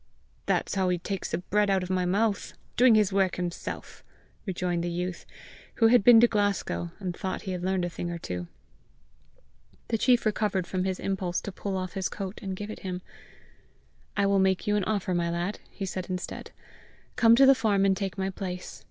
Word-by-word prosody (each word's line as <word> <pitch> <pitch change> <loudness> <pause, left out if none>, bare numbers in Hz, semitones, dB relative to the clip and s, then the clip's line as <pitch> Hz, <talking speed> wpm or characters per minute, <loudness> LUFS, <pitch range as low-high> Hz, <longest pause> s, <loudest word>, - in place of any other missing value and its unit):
"That's - - +1
how 190 -2 +1
he 180 - +1
takes 195 +2 -4
the - - -1
bread 205 +3 +1
out 190 -1 +2
of 180 - -5
my 185 -1 +1
mouth 205 +3 0 0.2
doing 245 -2 +6
his 210 -2 +3
work 195 -2 +2
himself!" 175 -1 -5 0.4
rejoined 180 -2 -1
the 175 - -1
youth, 175 +1 -4 0.5
who 225 -1 +5
had 240 -3 +5
been 235 +1 +9
to 240 - +7
Glasgow, 205 -5 -1
and 185 -4 -4
thought 190 +1 -4
he 190 - -4
had 180 -1 -4
learned 185 -1 0
a - - -2
thing 175 - -4
or 170 - -3
two. 90 - -5 1.4
The 225 - 0
chief 245 +1 +3
recovered 210 -3 0
from 185 +1 -2
his 190 -1 -2
impulse 185 -3 -1
to 200 - -6
pull 195 0 -4
off 185 -1 -4
his 190 -2 -2
coat 195 -1 -6
and 190 -3 -4
give 205 +2 -6
it - - -8
him. 185 -2 -5 1.1
"I 200 - +3
will 200 0 +3
make 190 -1 +2
you 210 - +2
an 205 -3 +1
offer, 205 -3 -1
my 170 -1 0
lad," 175 +4 -2
he 195 - -5
said 185 -1 -5
instead: 180 -1 -5 0.7
"come 230 -1 +6
to 270 +3 +7
the 270 - +8
farm 205 -6 +2
and 195 -1 +3
take 195 -1 -4
my 190 0 -1
place. 180 -1 -6
190 Hz, 205 wpm, -27 LUFS, 180-205 Hz, 1.4 s, been